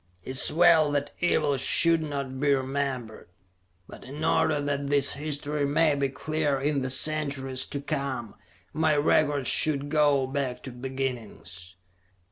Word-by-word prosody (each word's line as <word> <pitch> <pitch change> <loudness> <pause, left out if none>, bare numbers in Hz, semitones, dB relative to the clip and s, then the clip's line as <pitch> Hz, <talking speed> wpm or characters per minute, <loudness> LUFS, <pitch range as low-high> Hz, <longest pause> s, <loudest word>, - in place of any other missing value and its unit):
It 130 - -7
is 130 - +4
well 165 -2 +4
that 145 0 -2
evil 150 -5 +1
should 165 +5 +4
not 140 -3 -5
be 140 0 +3
remembered. 130 -4 -4 0.6
But - - -12
in 145 +4 -8
order 155 -2 +2
that 140 -1 -3
this 140 -1 +1
history 150 0 -3
may 150 +2 +2
be 140 -1 -1
clear 145 +1 -2
in 140 0 -1
the 130 - -2
centuries 135 -2 -1
to 140 - -4
come, 140 -6 -4 0.4
my 155 -1 +1
record 145 -2 +2
should 145 0 +2
go 145 -3 +2
back 130 -2 -4
to 130 - -7
beginnings. 120 -8 -6
140 Hz, 145 wpm, -26 LUFS, 130-150 Hz, 0.6 s, is